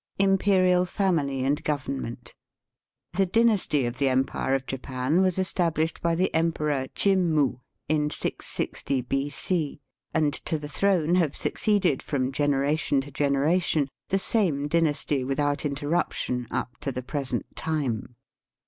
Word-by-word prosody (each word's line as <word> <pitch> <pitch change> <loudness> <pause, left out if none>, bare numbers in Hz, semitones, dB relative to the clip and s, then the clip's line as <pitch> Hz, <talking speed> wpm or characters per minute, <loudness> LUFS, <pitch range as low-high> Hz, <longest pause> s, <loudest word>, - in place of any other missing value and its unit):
Imperial 190 -2 +3
Family 165 -9 0
and 145 +3 0
Government. 130 -5 -4 0.4
— - - -59
The 195 -1 +3
dynasty 205 - +2
of 120 +2 -4
the 140 -1 +3
empire 130 +1 +1
of 135 -1 -2
Japan 135 +5 -1
was 185 -2 +2
estab 180 -3 +1
lished 160 +1 -1
by 170 -1 +1
the 185 +3 0
Emperor 150 -4 0
Jimmu, 165 -10 +2 0.3
in 150 -1 +1
660 140 -2 -3
B.C., 145 +5 -2 0.3
and 155 -2 +1
to 160 - -1
the 150 -1 -7
throne 175 +1 +1
have 160 -6 +2
succeeded, 200 - +1
from 130 -2 -1
gene 145 +1 +1
ration 145 +1 +1
to 145 +1 -10
generation, 145 +2 +1 0.2
the 195 - +2
same 175 -9 +1
dynasty 150 -4 +1
with 135 +2 -2
out 145 +1 0
interruption 145 -4 -1
up 125 - -3
to 140 - -3
the 130 0 -5
present 135 0 -3
time. 135 -7 -2
150 Hz, 140 wpm, -26 LUFS, 135-175 Hz, 0.4 s, Imperial